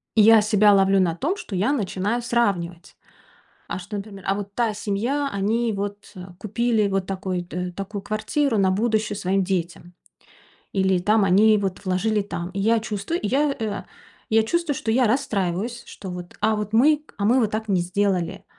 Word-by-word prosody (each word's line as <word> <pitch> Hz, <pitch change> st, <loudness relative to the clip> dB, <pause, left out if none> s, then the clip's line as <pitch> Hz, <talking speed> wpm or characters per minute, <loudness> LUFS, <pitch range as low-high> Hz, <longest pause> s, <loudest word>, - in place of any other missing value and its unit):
И 220 Hz, -, +6 dB
я 220 Hz, 0 st, +7 dB
себя 210 Hz, -1 st, +4 dB
ловлю 195 Hz, 0 st, +4 dB
на 170 Hz, -3 st, +1 dB
том, 335 Hz, -, -1 dB
что 215 Hz, -, -7 dB
я 205 Hz, +9 st, +1 dB
начинаю 210 Hz, -1 st, -1 dB
сравнивать. 195 Hz, -8 st, -1 dB, 0.7 s
А -, -, -3 dB
что, 205 Hz, +3 st, -7 dB
например: 200 Hz, -1 st, -8 dB
а 195 Hz, -, +2 dB
вот 200 Hz, 0 st, -6 dB
та 230 Hz, -3 st, 0 dB
семья, 235 Hz, +8 st, -1 dB
они 220 Hz, +4 st, 0 dB
вот 205 Hz, 0 st, -5 dB, 0.3 s
купили 215 Hz, 0 st, 0 dB
вот 195 Hz, -1 st, -1 dB
такой-то 180 Hz, -2 st, -4 dB
такую 195 Hz, +2 st, -6 dB
квартиру 225 Hz, +4 st, 0 dB
на 190 Hz, -1 st, +3 dB
будущее 215 Hz, 0 st, 0 dB
своим 195 Hz, 0 st, 0 dB
детям. 175 Hz, -1 st, -3 dB, 0.8 s
Или 190 Hz, -1 st, +2 dB
там 210 Hz, +3 st, +3 dB
они 210 Hz, +3 st, +5 dB
вот 195 Hz, -1 st, -3 dB
вложили 205 Hz, +3 st, +1 dB
там. 180 Hz, -3 st, -5 dB
И 195 Hz, +1 st, -4 dB
я 225 Hz, +2 st, +3 dB
чувствую, 215 Hz, -, -3 dB
я, 275 Hz, +6 st, +1 dB
э, 220 Hz, -3 st, -3 dB, 0.5 s
я 220 Hz, 0 st, +4 dB
чувствую, 335 Hz, +4 st, -1 dB
что 225 Hz, -, -3 dB
я 245 Hz, +1 st, +3 dB
расстраиваюсь. 220 Hz, -2 st, -1 dB
Что 190 Hz, -2 st, -9 dB
вот, 180 Hz, 0 st, -8 dB
а 215 Hz, +1 st, +2 dB
вот 210 Hz, 0 st, -4 dB
мы, 295 Hz, +6 st, +4 dB
а 200 Hz, -, -1 dB
мы 250 Hz, +4 st, +4 dB
вот 215 Hz, -, +1 dB
так 220 Hz, 0 st, -3 dB
не 190 Hz, -3 st, +2 dB
сделали. 190 Hz, 0 st, -1 dB
205 Hz, 180 wpm, -23 LUFS, 190-225 Hz, 0.8 s, я